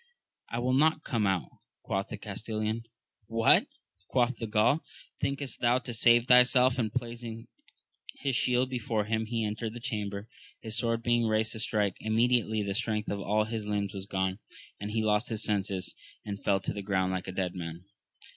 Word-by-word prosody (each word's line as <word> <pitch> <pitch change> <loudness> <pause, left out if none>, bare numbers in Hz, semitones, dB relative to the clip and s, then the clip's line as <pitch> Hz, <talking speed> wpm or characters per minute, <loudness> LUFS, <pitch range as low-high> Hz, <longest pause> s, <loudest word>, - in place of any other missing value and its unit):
I 115 - -3
will 125 +2 +1
not 155 +3 +3
come 115 -7 0
out, 95 -3 0 0.4
quoth 95 0 -2
the - - -6
Castellan. 110 +2 -3 0.4
What! 115 0 +4 0.4
quoth 125 -1 +2
he 115 - -2
of - - -7
Gaul, 110 +8 +3 0.4
thinkost 140 -2 -2
thou 120 +1 +3
so 130 - -5
to 120 - -4
save 120 +1 +5
thyself? 125 0 +6
and 110 -3 0
placing 115 -2 -5 0.7
his 135 -2 -1
shield 125 +1 +2
before 115 -4 -1
him 110 +1 -1
he 115 -1 -1
entered 110 +2 -3
the - - -5
chamber, 105 -2 -4 0.3
his 110 -1 -4
sword 115 -1 0
being 120 -1 +2
raised 110 0 +1
to 110 - -4
strike; 105 -3 +1
immediately 110 -1 +2
the 100 -1 -2
strength 105 -1 -1
of 100 - -2
all 105 +2 +1
his 110 -1 -4
limbs 100 -1 -1
was 95 -1 -6
gone, 95 0 -1 0.4
and 105 - -4
he 110 +1 0
lost 105 +2 +2
his 110 -3 -1
senses, 100 -2 0 0.3
and 100 -1 -5
fell 100 -1 +3
to 95 - -2
the 100 - -4
ground 95 -2 0
like 95 -1 -3
a - - -3
dead 90 -1 -2
man. 85 0 -7
110 Hz, 190 wpm, -29 LUFS, 100-120 Hz, 0.7 s, thyself